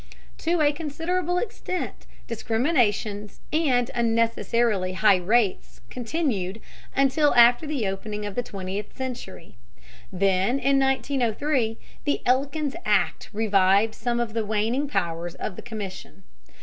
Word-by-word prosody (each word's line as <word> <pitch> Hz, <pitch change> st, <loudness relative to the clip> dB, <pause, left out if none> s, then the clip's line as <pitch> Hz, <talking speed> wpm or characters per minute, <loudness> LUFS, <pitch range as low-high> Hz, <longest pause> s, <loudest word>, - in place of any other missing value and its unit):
To 335 Hz, 0 st, +1 dB
a 290 Hz, -1 st, +5 dB
considerable 335 Hz, +4 st, -2 dB
extent 370 Hz, -3 st, -4 dB, 0.2 s
discriminations 225 Hz, -, 0 dB
and 260 Hz, -7 st, +2 dB
unnecessarily 230 Hz, -4 st, +1 dB
high 200 Hz, 0 st, +5 dB
rates 205 Hz, +2 st, 0 dB
continued 230 Hz, -, -2 dB, 0.4 s
until 275 Hz, +2 st, +3 dB
after 240 Hz, +5 st, +6 dB
the 285 Hz, -7 st, -1 dB
opening 210 Hz, +2 st, -4 dB
of 205 Hz, -, -4 dB
the 245 Hz, -, 0 dB
twentieth 195 Hz, -2 st, -6 dB
century. 255 Hz, -, -7 dB, 0.5 s
Then 195 Hz, +5 st, +2 dB
in 275 Hz, +1 st, +2 dB
1903 265 Hz, -2 st, 0 dB, 0.3 s
the 290 Hz, -, 0 dB
Elkins 280 Hz, +3 st, +1 dB
Act -, -, +1 dB
revived 205 Hz, 0 st, +3 dB
some 240 Hz, +1 st, -2 dB
of 235 Hz, -2 st, -2 dB
the 225 Hz, -1 st, 0 dB
waning 220 Hz, +7 st, 0 dB
powers 170 Hz, -, -2 dB
of -, -, -5 dB
the -, -, -8 dB
Commission. 210 Hz, -5 st, -8 dB
235 Hz, 120 wpm, -25 LUFS, 205-275 Hz, 0.5 s, after